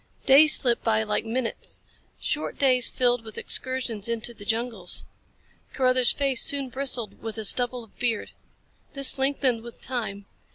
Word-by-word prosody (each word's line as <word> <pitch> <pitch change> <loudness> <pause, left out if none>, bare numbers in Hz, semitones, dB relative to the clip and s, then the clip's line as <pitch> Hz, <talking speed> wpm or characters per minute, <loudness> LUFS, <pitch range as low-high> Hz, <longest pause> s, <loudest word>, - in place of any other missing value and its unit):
Days 295 +3 +8
slipped 240 -3 +1
by 220 -1 +1
like 210 +1 -3
minutes. 230 +1 -4 0.4
Short 305 - -3
days 255 -3 +3
filled 245 -2 0
with 220 -1 -12
excursions 250 -5 -2
into 230 +1 -2
the 205 - -12
jungles. 225 -4 0 0.7
Carruthers' 255 -2 +2
face 275 -3 0
soon 280 -2 +1
bristled 255 -3 -1
with 225 0 -7
a 220 - -3
stubble 245 +2 +2
of 220 - -22
beard. 235 -3 -2 0.6
This 275 -1 +5
lengthened 265 -3 0
with 235 0 -12
time. 220 -6 -5
245 Hz, 150 wpm, -24 LUFS, 225-260 Hz, 0.7 s, Days